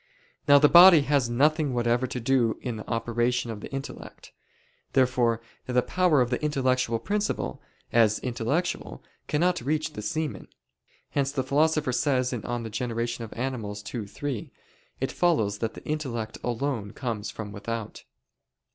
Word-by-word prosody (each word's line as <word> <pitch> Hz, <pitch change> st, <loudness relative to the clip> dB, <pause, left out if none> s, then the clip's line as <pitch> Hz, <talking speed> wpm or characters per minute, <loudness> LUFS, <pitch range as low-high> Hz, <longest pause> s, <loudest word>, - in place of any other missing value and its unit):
Now 145 Hz, 0 st, +8 dB
the 150 Hz, +1 st, +6 dB
body 175 Hz, 0 st, +9 dB
has 140 Hz, -3 st, +1 dB
nothing 145 Hz, +2 st, +2 dB
whatever 120 Hz, +1 st, +1 dB
to 125 Hz, -, -4 dB
do 120 Hz, -2 st, +2 dB
in 120 Hz, -4 st, -3 dB
the 105 Hz, -, -9 dB
operation 120 Hz, +1 st, 0 dB
of 110 Hz, -, -6 dB
the -, -, -8 dB
intellect. 135 Hz, 0 st, -8 dB, 0.6 s
Therefore 125 Hz, -3 st, +2 dB, 0.3 s
the 125 Hz, -1 st, +2 dB
power 170 Hz, 0 st, +3 dB
of 125 Hz, 0 st, 0 dB
the 125 Hz, -, -1 dB
intellectual 130 Hz, -5 st, +1 dB
principle, 210 Hz, -, -2 dB, 0.3 s
as 110 Hz, -2 st, +4 dB
intellectual, 125 Hz, +8 st, -2 dB, 0.2 s
cannot 175 Hz, +2 st, +1 dB
reach 155 Hz, +4 st, -1 dB
the 105 Hz, -, -6 dB
semen. 150 Hz, +8 st, -3 dB, 0.6 s
Hence 140 Hz, -1 st, 0 dB
the 135 Hz, -2 st, -1 dB
Philosopher 150 Hz, +1 st, +2 dB
says 130 Hz, -1 st, +1 dB
(De 125 Hz, -, -2 dB
Gener. 115 Hz, 0 st, -3 dB
Animal. 115 Hz, -5 st, -3 dB, 0.2 s
ii, 110 Hz, -5 st, -4 dB
3): 130 Hz, +1 st, -5 dB, 0.5 s
"It -, -, -1 dB
follows 110 Hz, -, +1 dB
that 115 Hz, -1 st, -3 dB
the -, -, -11 dB
intellect 125 Hz, -8 st, -3 dB
alone 120 Hz, -4 st, -2 dB
comes 115 Hz, -5 st, -4 dB
from 105 Hz, -2 st, -7 dB
without." 110 Hz, +2 st, -6 dB
125 Hz, 145 wpm, -26 LUFS, 115-145 Hz, 0.6 s, body